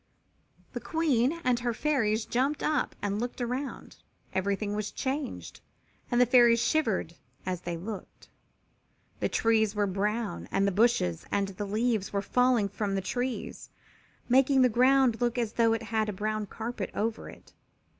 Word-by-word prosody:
The - - -3
Queen 315 -2 +1
and 250 -1 +2
her 240 -1 -2
Fairies 225 -7 +1
jumped 270 +5 0
up 305 -3 0
and 205 0 -1
looked 245 +1 -4
around. 250 +3 -4 0.4
Everything 200 +2 -1
was 210 0 -2
changed 275 0 -4 0.5
and 240 - +2
the 250 - +6
Fairies 240 -1 +5
shivered 230 - 0 0.3
as 180 -1 -3
they 175 -1 -4
looked. 200 +4 -8 0.9
The - - 0
trees 220 -2 +2
were 205 0 +2
brown 200 - -2
and 195 - +2
the - - +2
bushes 195 - +1
and 200 -1 0
the 195 +2 -5
leaves 215 -1 0
were 200 -1 -1
falling 250 -2 +2
from 200 0 -3
the 195 - 0
trees, 245 +6 -4 0.6
making 265 +1 +4
the 250 - +5
ground 250 0 +3
look 240 0 0
as 230 -3 -1
though 230 -1 +3
it 225 0 -2
had 220 -1 -1
a - - -3
brown 215 +2 -2
carpet 230 +4 -5
over 220 +1 -2
it. - - -15
225 Hz, 160 wpm, -28 LUFS, 205-250 Hz, 0.9 s, the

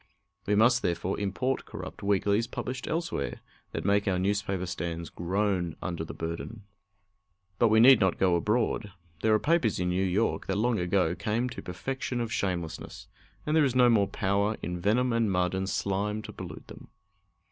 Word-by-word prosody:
We 105 - +3
must, 120 +3 +4
therefore, 90 +2 -1
import 105 +7 -1
corrupt - - -8
weeklies 100 +2 +1
published 130 +2 -5
elsewhere, 160 - -2 0.3
that 80 - -4
make 100 +1 +2
our 95 -2 +2
newspaper 95 -1 -1
stands 85 -2 -4
groan 90 -1 -1
under 85 -3 -3
the 80 - -8
burden. 85 +7 -5 1.0
But 120 - +5
we 110 0 +4
need 130 +1 +8
not 95 -3 +2
go 90 -2 +3
abroad. 105 +1 0 0.3
There 110 - +2
are - - +2
papers 145 - +1
in 90 0 0
New 90 +2 +1
York 95 +4 0
that 95 - 0
long 115 0 +1
ago 90 -1 +1
came 115 +6 -1
to 125 - -7
perfection 125 +7 -4
of 115 -1 -2
shamelessness, 85 -4 -4 0.4
and 150 - +1
there 160 - +5
is 130 -3 +1
no 125 -1 +6
more 100 -4 +3
power 100 +3 0
in 90 +1 -3
venom 115 +7 +2
and 115 -3 +2
mud 90 -1 +1
and 95 0 -2
slime 105 +3 -1
to - - -9
pollute - - -8
them. - - -12
100 Hz, 180 wpm, -28 LUFS, 90-115 Hz, 1.0 s, need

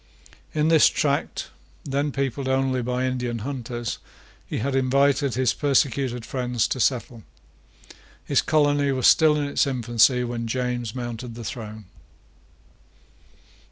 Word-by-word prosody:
In 155 +1 +2
this 160 -2 +6
tract, 145 -1 -1 0.3
then 140 +1 -1
peopled 135 0 -2
only 130 -1 +1
by 125 +1 -1
Indian 125 -2 -2
hunters, 120 -4 -4 0.5
he - - -4
had 135 +4 -2
invited 140 0 +2
his 130 -1 +2
persecuted 135 -4 0
friends 125 -3 -1
to 130 - -2
settle. 120 -1 0 1.0
His - - +2
colony 145 -2 +2
was 130 -2 -1
still 155 -2 +6
in 150 - 0
its 140 - +1
infancy 125 -1 +2
when 120 -1 -4
James 125 -1 -2
mounted 120 -1 -6
the 120 - -8
throne. 110 -1 -7
130 Hz, 125 wpm, -24 LUFS, 120-140 Hz, 1.0 s, this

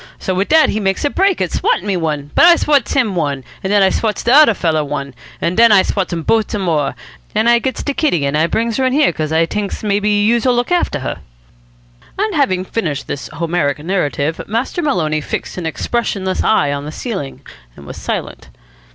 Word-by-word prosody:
So 190 - -3
wit 190 +2 -1
dat 315 0 +5
he 215 - -1
makes 195 +4 -1
a 290 - +1
break 385 - +1
at 180 - -1
swattin' 185 - 0
me 200 -2 0
one, 150 -4 -3
but - - +5
I 345 0 +8
swats 290 -7 +1
him 235 -8 +1
one, 145 -5 -2 0.2
an' 190 - -2
I 195 -2 +4
swats 215 -2 -1
de 240 - +2
odder 290 -7 +6
feller 160 -4 0
one, 140 -2 -5 0.3
an' 170 - -1
den 230 +3 +5
I 195 -2 +6
swats 195 -3 -1
dem 170 -2 -4
bote 220 +6 +1
some 205 -3 -3
more, 150 -6 0 0.4
an' 220 +2 +2
I 235 0 +5
gets 260 +2 -3
de 285 - -2
kitty, 175 - 0
an' 140 +1 -1
I 160 +2 +2
brings 230 +4 -1
her 265 - +1
in 255 - -1
here, 290 - +3
cos 155 -1 -3
I 160 +1 +3
t'inks 200 +5 -4
maybe 205 0 +1
youse'll 230 +4 +2
look 245 +7 -1
after 355 -1 0
her." - - -4 1.0
And 420 +1 -1
having 220 - +1
finished 160 -10 -3
this 140 - -5
Homeric 165 -4 -1
narrative, 160 -2 -2
Master 235 - -2
Maloney 160 - 0
fixed 165 - -5
an 165 - -3
expressionless 190 +1 -2
eye 145 -10 +2
on 140 0 -5
the 150 - -6
ceiling, 175 - -6 0.3
and 70 - -13
was - - -9
silent. - - -5
195 Hz, 215 wpm, -16 LUFS, 160-235 Hz, 1.0 s, I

